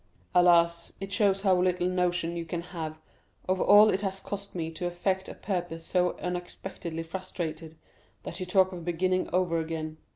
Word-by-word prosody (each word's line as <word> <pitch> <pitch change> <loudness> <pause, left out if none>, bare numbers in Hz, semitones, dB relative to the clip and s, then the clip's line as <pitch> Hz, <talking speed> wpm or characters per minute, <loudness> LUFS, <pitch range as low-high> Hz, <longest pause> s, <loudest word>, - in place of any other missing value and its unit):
"Alas, 170 -1 +4
it 195 0 -6
shows 195 -2 +2
how 190 -2 +4
little 180 -1 +1
notion 180 -2 0
you 170 - -3
can 170 +1 -4
have 160 -2 -4 0.5
of 185 0 +1
all 210 +1 +7
it 190 - 0
has 195 -1 -2
cost 200 0 -6
me 165 -2 -3
to 175 +2 -3
effect 185 +2 -1
a - - -8
purpose 175 -4 -4
so 180 -1 +1
unexpectedly 175 -2 -5
frustrated, 165 -2 -5 0.5
that - - -6
you 185 - -4
talk 185 0 +4
of 175 -2 -7
beginning 185 +2 0
over 175 -2 +1
again. 160 -1 -4
180 Hz, 170 wpm, -28 LUFS, 165-185 Hz, 0.5 s, all